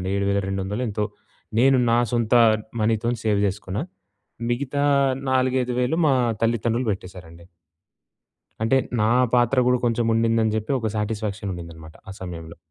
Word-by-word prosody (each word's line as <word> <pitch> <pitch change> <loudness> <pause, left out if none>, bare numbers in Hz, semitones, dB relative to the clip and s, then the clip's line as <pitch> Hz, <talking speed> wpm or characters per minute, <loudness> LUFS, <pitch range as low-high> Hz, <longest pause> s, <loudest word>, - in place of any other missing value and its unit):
ఉండిందండి.7200 100 +2 -1
ఎంతో 105 0 -1 0.5
నేను 135 +2 +5
నా 115 - +4
సొంత 115 -2 0 0.5
మనీతోని 115 +2 0
సేవ్ 105 -2 +2
చేసుకున్నా. 100 +4 -3 0.7
మిగతా 140 +3 -1 0.5
నాలుగైదు 130 -1 +1
వేలు 125 +6 0
మా 140 - +4 0.3
తల్లిదండ్రులు 115 +1 0
పెట్టేశారండి. 90 -3 -9 1.2
అంటే 115 +4 +3 0.2
నా 110 - +3 0.2
పాత్ర 120 +1 +3
గూడా 125 0 +3
కొంచెం 115 0 +1
ఉండిందని 115 -1 +2
చెప్పి, 110 +4 -3
ఒక 115 - -2
సాటిస్ఫాక్షన్ 105 -1 -3
ఉండిందన్నమాట 80 -2 -10
ఆ - - -6
సమయంలో. 85 -3 -8
110 Hz, 125 wpm, -23 LUFS, 95-120 Hz, 1.2 s, నేను